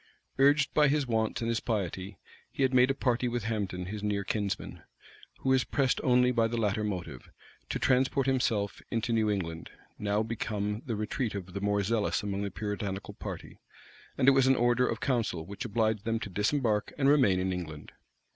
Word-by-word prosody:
Urged 140 +1 +4
by 150 -1 +5
his 145 0 +1
wants 110 -2 0
and - - -1
his 115 -1 +1
piety, 95 -4 -3 0.3
he 140 - -1
had 130 0 +2
made 125 +1 +5
a 135 - +1
party 125 -2 0
with 120 -2 -2
Hambden, 100 -5 -2
his 105 +3 -5
near 100 -1 -1
kinsman, 100 +1 -3 0.6
who 130 - -1
was 130 -1 +4
pressed 135 -2 0
only 125 -1 +4
by 115 -2 +2
the 120 +1 -3
latter 110 -1 0
motive, 90 -11 -5 0.4
to - - -1
transport 130 +1 +2
himself 125 -6 0
into 115 0 -1
New 110 -1 +2
England, 85 -5 -3 0.3
now 105 +1 +1
become 105 -1 -3
the 115 - -1
retreat 105 +2 -2
of 95 -2 -6
the 100 - -4
more 100 0 +1
zealous 110 +1 0
among 100 -1 -2
the 100 - -2
Puritanical 100 -1 -4
party; - - -8 0.6
and 130 - +2
it - - +10
was 135 -1 +4
an 135 - +5
order 120 +1 +3
of 115 - -2
council 115 - -1
which 100 +6 -6
obliged 110 -2 0
them 115 0 -1
to 100 - -6
disembark 105 +2 0
and 135 -2 +2
remain 130 -11 +4
in 95 0 0
England. 80 -4 -7
110 Hz, 195 wpm, -30 LUFS, 100-125 Hz, 0.6 s, it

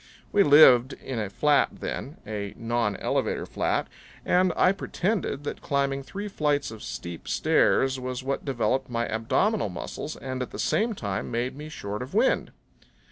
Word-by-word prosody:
We 205 - +4
lived 145 -6 +7
in 130 -3 -5
a 105 -3 -2
flat 145 +8 +3
then 140 +4 -5
a 105 -1 -5
nonelevator 115 -3 -1
flat - - 0 0.4
and 180 0 +3
I 180 - +5
pretended 195 -5 -2
that 145 - -5
climbing 140 -1 0
three 200 +9 -6
flights 150 - 0
of 110 -1 -9
steep 85 -1 -7
stairs 135 0 +2
was 130 0 -4
what 135 +1 -2
developed 135 0 0
my 115 -1 -1
abdominal 115 - +1
muscles 120 - -6
and 130 -1 -5
at 125 - -3
the - - -8
same 225 0 +1
time 100 - -3
made 120 +3 -2
me 150 +2 -8
short 105 -7 -5
of 130 +9 -7
wind. 235 +5 +2
135 Hz, 160 wpm, -26 LUFS, 115-155 Hz, 0.4 s, lived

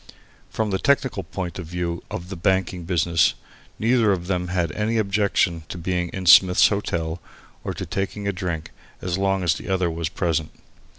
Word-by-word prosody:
From 110 -2 -2
the 95 - 0
technical 135 -7 +1
point 90 +1 -5
of 85 - -6
view 85 0 -3
of 90 +1 -6
the 95 - -5
banking 90 -1 0
business, 85 -3 +2 0.4
neither 115 -1 +3
of 90 -3 -1
them 90 -1 -1
had 90 -3 -1
any 110 +6 -1
objection 100 -5 +1
to - - -5
being 90 0 -1
in 95 +1 -6
Smith's 90 +1 +7
Hotel 85 -5 -2 0.4
or - - -4
to - - -5
taking 100 +1 -3
a 100 - 0
drink 85 -4 -4 0.3
as 90 0 -2
long 95 -1 +1
as 85 -3 +3
the 75 - -8
other 95 -3 +1
was 80 0 -3
present. 80 -4 -1
90 Hz, 180 wpm, -23 LUFS, 85-100 Hz, 0.4 s, Smith's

